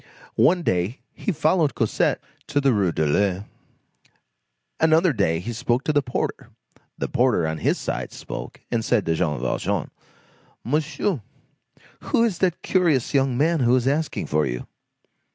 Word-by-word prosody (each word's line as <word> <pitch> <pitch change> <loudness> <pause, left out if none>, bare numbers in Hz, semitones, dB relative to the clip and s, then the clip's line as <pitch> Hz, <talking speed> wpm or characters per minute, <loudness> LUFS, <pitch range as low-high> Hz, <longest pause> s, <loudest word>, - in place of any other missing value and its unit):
One 175 +1 +4
day 90 - -1
he - - -2
followed 155 - +2
Cosette - - +1 0.3
to 145 - +1
the 135 -2 +3
Rue 100 -5 +2
de 80 - 0
l'Ouest. 95 +5 +1 1.3
Another 160 +1 +4
day 100 -8 +1
he 120 +7 -5
spoke 120 +3 0
to 155 - 0
the 145 - +4
porter. 125 -2 -3 0.5
The - - -2
porter, 125 -9 +2
on 80 0 -3
his - - +1
side, - - -4
spoke, - - -8
and 115 -2 0
said 115 -4 +1
to 80 - +1
Jean 75 -5 0
Valjean: 65 - -1 0.7
"Monsieur, 150 - -1 0.8
who 230 - +1
is 215 -7 0
that 180 -3 0
curious 165 -10 +2
young 135 -3 +2
man 160 +4 +2
who 125 -1 +4
is 125 0 +1
asking 150 +3 0
for 75 +1 +1
you?" - - -4
125 Hz, 155 wpm, -23 LUFS, -, 1.3 s, One